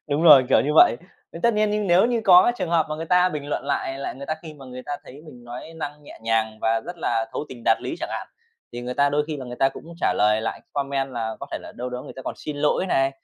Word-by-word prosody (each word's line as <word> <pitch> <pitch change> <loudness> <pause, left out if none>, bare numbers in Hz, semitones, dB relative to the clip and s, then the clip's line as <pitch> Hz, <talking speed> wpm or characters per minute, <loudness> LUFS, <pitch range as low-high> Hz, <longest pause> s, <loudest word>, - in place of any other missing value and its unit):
Đúng 145 +2 0
rồi, 145 -6 +9
kiểu - - +5
như 150 +2 0
vậy. 120 - +7 0.4
Thì 165 - -7
tất 235 -1 +3
nhiên 210 -1 +1
nếu 180 +4 +5
như 240 -1 0
có 185 +5 +7
trường 185 -3 -2
hợp 165 -2 +3
mà 155 - -3
người 160 +1 -5
ta 180 +1 +4
bình 150 -5 -5
luận 145 - -2
lại 135 -1 -2
lại 140 - -4
người 140 +2 -9
ta 155 - -1
khi 160 -2 -9
mà 140 -2 -13
người 125 0 -8
ta 145 0 -3
thấy - - -12
mình 125 -5 -13
nói 120 +7 -8
năng 150 -1 -6
nhẹ - - -13
nhàng 110 -1 0
và 115 0 +1
rất 175 +9 -8
là 115 -7 0
thấu - - -3
tình 120 -3 -11
đạt 115 - +3
lý - - -3
chẳng - - -3
hạn, - - -4 0.5
thì 120 - -5
người 125 +1 -4
ta 140 +2 +3
đôi 150 +1 +1
khi 155 -1 -4
là 135 - -7
người 125 0 -8
ta 135 - +3
cũng 135 - -11 0.2
trả - - +2
lời 105 +1 +3
lại 115 - -4
comment 140 -1 -2
là 110 -2 -3
có - - -6
thể - - -2
là - - -10
đâu 125 +1 -4
đó 125 +1 -5
người - - -10
ta 130 - -7
còn - - -4
xin 150 - -6
lỗi 150 +5 +1
này, 135 -6 +2
140 Hz, 300 wpm, -23 LUFS, 125-160 Hz, 0.5 s, rồi